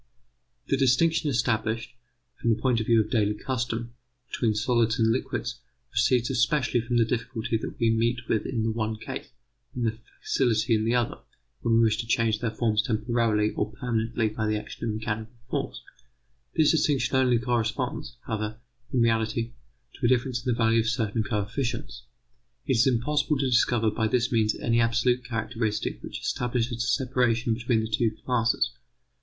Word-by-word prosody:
The 135 - +1
distinction 150 +5 +3
established, 115 -2 0 0.5
from 115 - 0
the 110 -1 +2
point 125 -1 +2
of 110 - -3
view 115 -1 +5
of 110 - -5
daily 105 -3 +2
custom, 120 -1 -3 0.4
between 110 -3 0
solids 115 +1 +2
and 115 -2 +3
liquids, 125 - -2 0.3
proceeds 120 +1 +2
especially 125 -1 +2
from 120 +1 -1
the 115 - +4
difficulty 115 -1 -2
that - - -6
we 115 -2 +3
meet 120 +1 0
with 110 - 0
in 115 -4 -1
the 110 - +1
one 110 -1 -2
case, 110 - -7 0.5
and 120 -2 -1
the 110 0 -1 0.2
facility 115 -4 +2
in 110 0 +2
the 115 +2 +2
other, 120 -2 0 0.4
when 115 -1 +2
we 115 - +5
wish 110 -1 +3
to 115 - -3
change 115 -2 +2
their 115 0 -1
form 110 -1 -1
temporarily 110 -1 +1
or - - -2
permanently 115 -1 -1
by 110 0 -2
the 105 0 +1
action 110 +2 -6
of 105 - -2
mechanical 110 +2 -4
force. - - -3 0.7
This 155 -2 +5
distinction 140 -5 +1
only 125 -2 +4
corresponds, 120 0 -2
however, 110 0 -3 0.3
in 125 - +2
reality, 115 0 +1 0.5
to 130 - -1
a - - +2
difference 125 -1 +1
in 125 - 0
the 115 - 0
value 115 0 +3
of 110 0 +1
certain 115 -1 0
coefficients. 115 +3 -3 0.6
It 130 -4 +1
is 120 - +4
impossible 145 +5 +1
to 135 - 0
discover 120 -3 +3
by 110 +1 0
this 125 +2 +1
means 110 -2 +2
any 115 0 +1
absolute 120 +2 +2
characteristic 115 -2 -2
which - - -6
establishes 120 -1 -1
a - - -2
separation 125 -3 +1
between 120 0 0
the 110 - -2
two 115 +1 +1 0.2
classes. 120 0 +1
115 Hz, 175 wpm, -26 LUFS, 110-125 Hz, 0.7 s, view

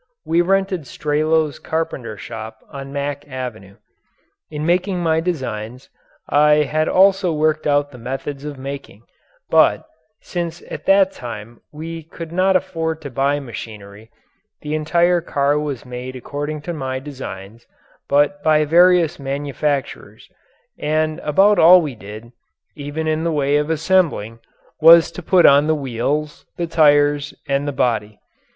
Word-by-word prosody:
We 165 +2 +2
rented 190 -4 0
Strelow's 155 +2 0
carpenter 140 -9 -4
shop 110 0 -8
on 135 0 -8
Mack 145 0 -4
Avenue. 120 -7 -7 0.7
In 150 0 -4
making 180 +2 +1
my 160 -2 +1
designs 130 -8 -4 0.4
I 150 +1 +4
had 155 +2 -1
also 190 -1 +4
worked 155 0 0
out 145 0 +1
the 125 - -12
methods 135 +3 -5
of 150 -2 -6
making, 135 -5 -8 0.5
but, - - +4 0.3
since 170 -1 -5
at - - -7
that 195 -1 +5
time 115 - -9
we 165 +2 -7
could 165 +1 -10
not 185 +2 +2
afford 165 -4 -1
to 140 - -7
buy 140 +3 0
machinery, 110 -4 -10 0.5
the 150 0 -5
entire 170 +3 +2
car 145 -2 0
was 145 -5 -5
made 125 +1 -7
according 145 +4 -5
to 175 - -4
my 130 -4 -4
designs, 120 -6 -9 0.4
but 145 +7 +2
by 155 -3 +3
various 175 0 +4
manufacturers, 140 0 -3 0.5
and 155 +1 -1
about 195 +8 +3
all 180 +3 +8
we 150 -6 -3
did, 110 +2 -11 0.4
even 145 +2 -5
in 155 0 0
the 170 - 0
way 145 -2 +1
of 150 +1 -1
assembling, 160 - 0 0.4
was 165 +1 +8
to - - -8
put 180 +1 +4
on 140 +2 +6
the 155 - +2
wheels, 145 +3 -3
the 175 - -1
tires, 145 -2 +3
and 140 +1 0
the - - -1
body. 110 -5 -1
150 Hz, 145 wpm, -19 LUFS, 135-165 Hz, 0.7 s, all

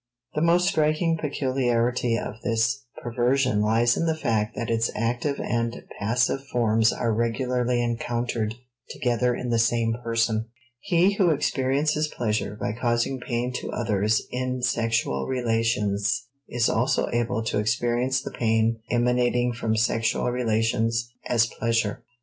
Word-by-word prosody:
The 150 - -1
most 175 +2 +3
striking 155 +2 +2
peculiarity 125 -4 0
of 110 - -6
this 120 +4 0 0.2
perversion 125 -1 +1
lies 115 +3 +3
in 165 - 0
the 160 -1 0
fact 115 -6 -1
that 115 0 -3
its 115 0 +1
active 120 +5 -1
and 115 0 -2 0.2
passive 120 +5 +1
forms 115 -3 +2
are 115 -2 -1
regularly 120 +1 0
encountered 120 -1 -2 0.3
together 125 0 0
in 125 0 -4
the 115 - +2
same 115 0 +2
person. 115 -1 0 0.3
He 190 0 +2
who 185 -4 +4
experiences 150 +1 +1
pleasure 105 -6 -2
by - - -1
causing 120 +2 0
pain 125 0 -2
to - - -6
others 110 -1 +1
in 125 0 -2
sexual 115 - 0
relations 115 -3 0 0.3
is 120 -1 +1
also 125 +3 +1
able 120 -1 0
to 110 - -1
experience 120 +4 0
the - - -6
pain 115 0 +1
emanating 125 0 +2
from 110 -1 -1
sexual 115 +1 +1
relations 115 0 0 0.2
as 115 -1 +3
pleasure. 115 -2 -1
120 Hz, 135 wpm, -25 LUFS, 115-125 Hz, 0.3 s, who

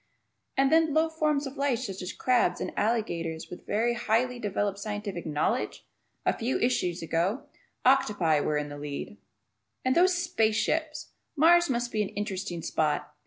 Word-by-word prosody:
And 270 0 +3
then 320 -2 +4
low 320 +1 +3
forms 305 -2 0
of 270 +1 -7
life 275 -3 +1
such 195 -2 -5
as 180 +1 -4
crabs 250 -1 +1
and - - -3
alligators 170 -8 -1
with 180 - -10
very 235 +3 +1
highly 240 +2 0
developed 205 -2 -1
scientific 205 -4 -4
knowledge! 150 -1 -1 0.4
A - - +3
few 240 +3 -1
issues 180 -9 0
ago 175 - 0 0.4
octopi 205 - +3
were 150 +1 0
in 150 0 -3
the 145 0 -8
lead! 145 +7 -6 0.7
And 255 - +3
those 365 +1 +5
"space" 280 -12 +1
ships! 310 +5 -1 0.2
Mars 340 +2 +5
must 240 -1 -1
be 215 - 0
an 205 - -1
interesting 190 -5 -4
spot. 150 -2 -1
220 Hz, 165 wpm, -28 LUFS, 180-275 Hz, 0.7 s, those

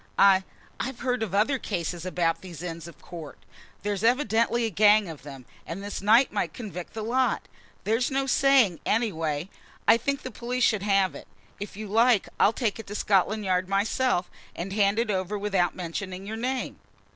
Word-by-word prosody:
I 190 -1 +6 0.4
I've 265 -1 -4
heard 250 -1 0
of 200 -4 -2
other 255 +7 +2
cases 175 -4 -3
about 170 -2 0
these 175 -3 -9
Inns 165 -2 -6
of 170 - -13
Court. 165 -4 -9 0.5
There's 205 0 -2
evidently 235 -1 +2
a 225 - -2
gang 210 +1 +5
of 160 -3 -8
them, 135 -3 -10 0.2
and 185 +4 -6
this 205 -1 -5
knife 225 +6 +5
might - - -2
convict 195 -8 -7
the 220 - -4
lot; 255 +3 0 0.4
there's 225 +4 +1
no 270 0 0
saying; 265 -9 +4
anyway 165 -8 -1 0.4
I - - +7
think 280 +4 -2
the 255 - -6
police 250 +3 -2
should 215 -5 +3
have 195 -2 +2
it. - - -11 0.3
If 205 0 -7
you 215 - -5
like 225 +1 +3
I'll 205 - +5
take 230 -2 -2
it 225 - -8
to 205 - -6
Scotland 210 +1 +1
Yard 185 0 0
myself, 200 -1 +1 0.3
and 190 +3 -5
hand 200 0 +2
it 230 -2 +1
over 190 +1 -2
without 195 -4 0
mentioning 185 +2 -5
your 215 +2 -5
name." 255 +3 -3
205 Hz, 185 wpm, -26 LUFS, 185-230 Hz, 0.5 s, I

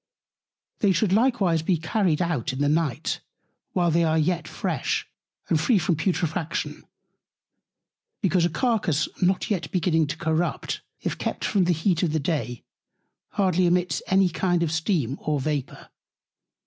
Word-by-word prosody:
They 200 -2 +3
should 185 +2 +1
likewise 205 -8 +3
be 170 +2 +1
carried 170 0 +1
out 155 -8 -1
in - - -5
the 145 +1 +1
Night, 150 -4 0 0.5
while 175 -2 +2
they 170 +2 +3
are 160 0 +2
yet 170 +2 0
fresh - - -2 0.4
and 155 - +2
free 230 +5 +3
from 175 -1 +1
Putrefaction: 165 0 -2 1.3
Because 190 -4 +2
a 170 - +3
Carcass 185 - +1
not 185 +3 +1
yet 190 -5 -1
beginning 165 -3 +2
to 155 +2 -4
Corrupt, 160 +1 -1 0.2
if - - -3
kept - - -2
from 195 -4 +2
the 180 - +2
Heat 165 +1 +1
of 165 -4 0
the 160 - +1
Day, 140 -5 -2 0.7
hardly 185 -2 +2
emits 180 +1 +1
any 190 0 +4
kind 175 0 +1
of 160 - -1
Steam 160 - 0
or 150 -2 0
Vapour. 140 -1 -3
170 Hz, 150 wpm, -25 LUFS, 155-185 Hz, 1.3 s, any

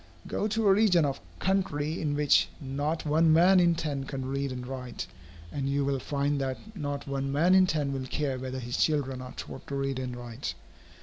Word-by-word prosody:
Go 210 - -1
to 220 0 +1
a 195 - +7
region 190 -6 +4
of 135 -8 -2 0.2
country 160 -5 0
in 145 -3 0
which 145 -1 +4
not 145 +4 -2
one 160 +2 +4
man 180 +4 +6
in 170 -1 +4
ten 145 -4 -2
can 135 -1 -4
read 140 +1 -2
and 125 -1 -5
write, 125 -1 -5 0.5
and 135 +4 -2
you 140 0 +1
will 140 -1 0
find 140 +1 -1
that 130 -1 -1 0.2
not 145 -5 -3
one 135 0 -2
man 165 +6 +4
in 185 -1 +6
ten 150 -4 0
will 130 -1 -3
care 135 -2 -1
whether 130 0 -4
his 120 -1 -3
children 135 -4 +1
are 125 0 -8
taught - - -8
to 140 - -4
read 135 -1 -1
and 125 -1 -4
write. 120 -6 -5
140 Hz, 205 wpm, -29 LUFS, 135-160 Hz, 0.5 s, a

